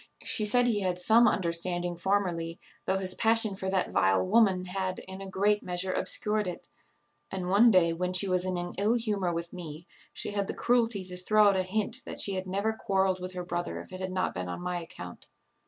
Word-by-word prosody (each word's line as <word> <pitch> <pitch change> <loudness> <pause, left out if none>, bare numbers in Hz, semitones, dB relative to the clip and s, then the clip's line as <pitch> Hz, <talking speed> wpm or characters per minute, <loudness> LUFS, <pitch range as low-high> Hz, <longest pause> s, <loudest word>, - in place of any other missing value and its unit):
She 215 - +2
said 245 +4 +3
he 230 -4 +1
had 185 -2 -1
some 225 +6 +5
understanding 175 -2 0
formerly, 175 -2 -1 0.3
though 190 - +2
his 185 -1 +1
passion 225 -2 +2
for 190 0 -4
that 190 -1 0
vile 95 -1 +2
woman 195 - +3
had, 185 0 -3
in 190 +1 -9
a 195 - -7
great 205 +2 +1
measure, 180 +1 -3
obscured 210 -1 0
it; 180 - -7 0.6
and 185 -2 -4
one 210 +5 +6
day, 180 -5 +4
when 180 +2 -2
she 185 +2 +2
was 180 -1 +2
in 185 -1 -2
an 175 0 -4
ill 215 +4 +2
humour 205 -6 -1
with 170 0 -5
me, 170 -2 -8 0.3
she - - -4
had 200 -1 -2
the - - -4
cruelty 230 -5 +1
to 180 0 -8
throw 210 +3 +4
out 200 - +1
a 190 - +2
hint 215 +6 -1
that - - -7
she 200 - +3
had 185 0 -4
never 200 +4 -1
quarrelled 190 -3 0
with 180 +1 -6
her 180 -1 -5
brother 175 0 -3
if - - -11
it 185 - -6
had 185 0 -4
not 185 0 -1
been 90 0 -5
on - - -5
my 180 0 -3
account." 90 - -10
185 Hz, 220 wpm, -28 LUFS, 180-205 Hz, 0.6 s, one